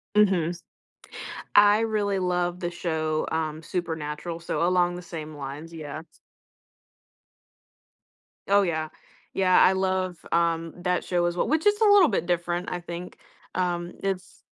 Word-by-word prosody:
Mhm. 190 Hz, -6 st, +4 dB
S 175 Hz, 0 st, -8 dB, 0.9 s
I 205 Hz, +1 st, +7 dB
really 210 Hz, -3 st, 0 dB
love 180 Hz, -1 st, 0 dB
the 175 Hz, -, -2 dB
show, 160 Hz, -3 st, -1 dB
um, 160 Hz, -1 st, -2 dB
Supernatural, 165 Hz, -1 st, -4 dB
so 170 Hz, 0 st, -1 dB
along 175 Hz, -1 st, +2 dB
the 180 Hz, -, -7 dB
same 155 Hz, -3 st, -7 dB
lines, 145 Hz, +3 st, -7 dB
yeah, 150 Hz, -3 st, -6 dB
s -, -, -27 dB, 2.3 s
Oh, 200 Hz, +1 st, +5 dB
yeah. 160 Hz, -4 st, -1 dB, 0.5 s
Yeah, 185 Hz, -1 st, +4 dB
I -, -, +6 dB
love, 185 Hz, -1 st, 0 dB
um, 165 Hz, -1 st, +1 dB
that 180 Hz, 0 st, 0 dB
show 175 Hz, -1 st, 0 dB
as 175 Hz, 0 st, 0 dB
we -, -, +2 dB
which 315 Hz, +3 st, 0 dB
is 415 Hz, +1 st, +4 dB
a -, -, +5 dB
little 405 Hz, -5 st, +7 dB
bit 175 Hz, -, -1 dB
different, 175 Hz, 0 st, -1 dB
I 180 Hz, -, -3 dB
think. 175 Hz, +1 st, -7 dB, 0.4 s
Um, 175 Hz, -1 st, -1 dB
it's 190 Hz, -2 st, -4 dB
175 Hz, 150 wpm, -26 LUFS, 165-190 Hz, 2.3 s, I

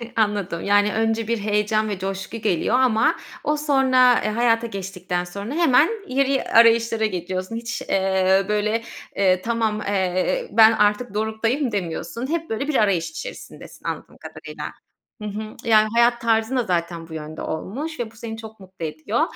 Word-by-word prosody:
Anladım. 205 Hz, -6 st, 0 dB
Yani, 205 Hz, +1 st, +3 dB
önce 225 Hz, 0 st, 0 dB
bir 230 Hz, 0 st, 0 dB
heyecan 210 Hz, +1 st, 0 dB
ve 200 Hz, -3 st, -4 dB
coşku 195 Hz, +3 st, -4 dB
geliyor 210 Hz, -1 st, 0 dB
ama 245 Hz, -4 st, +3 dB, 0.3 s
o 300 Hz, 0 st, 0 dB
sonra, 260 Hz, -4 st, +4 dB
eee, -, -, 0 dB
hayata 230 Hz, +1 st, +2 dB
geçtikten 185 Hz, -3 st, -4 dB
sonra 200 Hz, +7 st, -6 dB
hemen 315 Hz, -1 st, +4 dB, 0.2 s
yeri 270 Hz, 0 st, +1 dB
arayışlara 230 Hz, -1 st, +4 dB
geçiyorsun. 185 Hz, +1 st, -3 dB
Hiç, 230 Hz, -1 st, -4 dB
eee, 190 Hz, 0 st, +2 dB
böyle, 215 Hz, +2 st, 0 dB, 0.3 s
eee, 185 Hz, -2 st, +3 dB
tamam, 225 Hz, -1 st, -1 dB
eee, 195 Hz, -, 0 dB
"Ben 220 Hz, 0 st, +7 dB
artık 210 Hz, +1 st, +1 dB
doruktayım." 225 Hz, +5 st, -1 dB
demiyorsun. 200 Hz, +6 st, -4 dB
Hep, 330 Hz, +2 st, -2 dB
böyle, 225 Hz, +6 st, -2 dB
bir 305 Hz, -, -1 dB
arayış 200 Hz, -, +2 dB
içerisindesin -, -, -10 dB
anladığım -, -, -6 dB
kadarıyla. -, -, -9 dB, 0.6 s
Hı 210 Hz, -, -4 dB
hı. 215 Hz, +1 st, -6 dB
Yani 215 Hz, -1 st, +6 dB
hayat 235 Hz, 0 st, +4 dB
tarzın 225 Hz, +2 st, +1 dB
da 250 Hz, -, +2 dB
zaten 170 Hz, -3 st, -2 dB
bu 160 Hz, -, -11 dB
yönde 155 Hz, 0 st, -7 dB
olmuş 255 Hz, -, -5 dB
ve 225 Hz, -2 st, -3 dB
bu -, -, -21 dB
seni 225 Hz, 0 st, -7 dB
çok 220 Hz, -1 st, -11 dB
mutlu 185 Hz, -3 st, -8 dB
ediyor. 155 Hz, -, -2 dB
220 Hz, 160 wpm, -22 LUFS, 195-235 Hz, 0.6 s, Ben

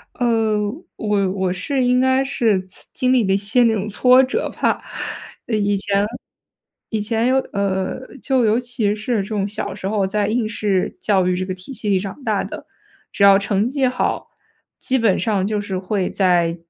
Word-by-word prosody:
呃， 225 Hz, -3 st, +1 dB, 0.4 s
我 205 Hz, -3 st, 0 dB
我 190 Hz, -1 st, -1 dB
是 255 Hz, +9 st, -1 dB
应 250 Hz, 0 st, +3 dB
该 260 Hz, +1 st, +3 dB
是， 230 Hz, -8 st, +1 dB
呲 185 Hz, -, -17 dB
经 255 Hz, 0 st, +1 dB
历 250 Hz, -4 st, +3 dB
了 190 Hz, -, +3 dB
一 195 Hz, -, +3 dB
些 215 Hz, +5 st, +2 dB
那 230 Hz, -1 st, +4 dB
种 210 Hz, -1 st, -2 dB
挫 250 Hz, +5 st, +5 dB
折 260 Hz, -, -1 dB
吧。 -, -, +2 dB, 0.7 s
以 205 Hz, -3 st, +1 dB
前 200 Hz, +1 st, +1 dB, 0.8 s
以 220 Hz, -2 st, -1 dB
前 225 Hz, +2 st, 0 dB
有 260 Hz, +1 st, +3 dB, 0.2 s
呃， 195 Hz, +1 st, -1 dB, 0.2 s
就 260 Hz, -3 st, +2 dB
尤 220 Hz, +2 st, +3 dB
其 235 Hz, -4 st, -1 dB
是 220 Hz, +3 st, -2 dB
这 -, -, -9 dB
种 205 Hz, -2 st, -1 dB
小 205 Hz, -, -4 dB
时 190 Hz, -, -5 dB
候 205 Hz, -1 st, +1 dB
在 205 Hz, +1 st, 0 dB
应 225 Hz, +1 st, 0 dB
试 205 Hz, -3 st, -1 dB
教 195 Hz, -3 st, +2 dB
育 180 Hz, 0 st, +1 dB
这 185 Hz, +1 st, -2 dB
个 185 Hz, -, -3 dB
体 185 Hz, +9 st, -10 dB
系 220 Hz, -3 st, -3 dB
里 195 Hz, -2 st, +3 dB
长 200 Hz, +8 st, -7 dB
大 -, -, 0 dB
的， -, -, -8 dB, 0.4 s
只 200 Hz, -, 0 dB
要 195 Hz, 0 st, +7 dB
成 200 Hz, +1 st, 0 dB
绩 270 Hz, 0 st, +1 dB
好， 250 Hz, -, -2 dB, 0.5 s
基 260 Hz, 0 st, 0 dB
本 220 Hz, -5 st, +2 dB
上 205 Hz, -4 st, 0 dB
就 210 Hz, 0 st, -1 dB
是 195 Hz, -2 st, -3 dB
会 190 Hz, 0 st, -1 dB
在 175 Hz, -3 st, +2 dB
210 Hz, 210 characters per minute, -20 LUFS, 195-240 Hz, 0.8 s, 要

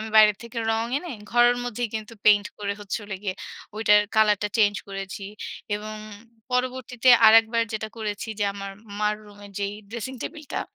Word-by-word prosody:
আমি 220 Hz, 0 st, -6 dB
বাইরে 215 Hz, -1 st, +8 dB
থেকে 235 Hz, 0 st, -7 dB
রং 225 Hz, +1 st, 0 dB
এনে 350 Hz, +1 st, -8 dB, 0.2 s
ঘরের 240 Hz, 0 st, +5 dB
মধ্যেই 245 Hz, 0 st, -2 dB
কিন্তু 220 Hz, +1 st, -5 dB
পেইন্ট 205 Hz, 0 st, +6 dB
করে 200 Hz, -1 st, -2 dB
হচ্ছে 205 Hz, +1 st, -3 dB
হল 205 Hz, -1 st, -8 dB
গিয়ে 190 Hz, -3 st, -2 dB, 0.4 s
ওইটার 210 Hz, -1 st, +5 dB, 0.2 s
কালারটা 210 Hz, -1 st, +4 dB
চেঞ্জ 205 Hz, -2 st, +4 dB
করেছি 195 Hz, 0 st, -6 dB, 0.5 s
এবং 215 Hz, +1 st, -7 dB, 0.5 s
পরবর্তীতে 250 Hz, 0 st, -1 dB, 0.2 s
আরেকবার 225 Hz, +1 st, +6 dB
যেটা 220 Hz, 0 st, -3 dB
করেছি 210 Hz, 0 st, -4 dB
যে -, -, +3 dB
আমার 195 Hz, -1 st, -6 dB, 0.3 s
মার 210 Hz, 0 st, +1 dB
রুমে 205 Hz, 0 st, -13 dB
যেই 200 Hz, 0 st, -2 dB, 0.2 s
ড্রেসিং 235 Hz, +3 st, -5 dB
টেবলটা 310 Hz, -4 st, -5 dB
215 Hz, 160 wpm, -25 LUFS, 205-235 Hz, 0.5 s, বাইরে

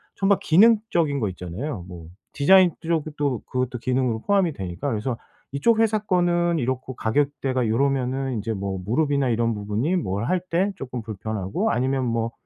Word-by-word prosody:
정말 195 Hz, 0 st, +2 dB
기능적인 175 Hz, -6 st, +3 dB
거 105 Hz, -5 st, 0 dB
있잖아요. 90 Hz, -, -6 dB
뭐 85 Hz, -3 st, -10 dB, 0.3 s
디자인 180 Hz, +5 st, +5 dB
쪽도 150 Hz, -5 st, -1 dB
그것도 125 Hz, -1 st, -2 dB
기능으로 125 Hz, -2 st, 0 dB
포함이 195 Hz, -5 st, +3 dB
되니까 95 Hz, +6 st, -4 dB
그래서 115 Hz, +1 st, -2 dB, 0.4 s
이쪽 220 Hz, +11 st, +2 dB
회사 220 Hz, -1 st, +3 dB
거는 175 Hz, -4 st, +1 dB
이렇고 130 Hz, 0 st, -3 dB
가격대가 130 Hz, 0 st, 0 dB
요러면은 135 Hz, +1 st, 0 dB
이제 110 Hz, +2 st, -3 dB
뭐 95 Hz, -2 st, -4 dB
무릎이나 140 Hz, +3 st, +1 dB
이런 115 Hz, 0 st, +1 dB
부분이 105 Hz, -, -1 dB
뭘 100 Hz, -, -2 dB
할 185 Hz, -, +1 dB
때 185 Hz, +4 st, +2 dB
쪼끔 125 Hz, -2 st, -5 dB
불편하고 105 Hz, -2 st, -2 dB
아니면 130 Hz, +2 st, 0 dB
뭐 115 Hz, 0 st, -1 dB
130 Hz, 360 characters per minute, -24 LUFS, 110-160 Hz, 0.4 s, 디자인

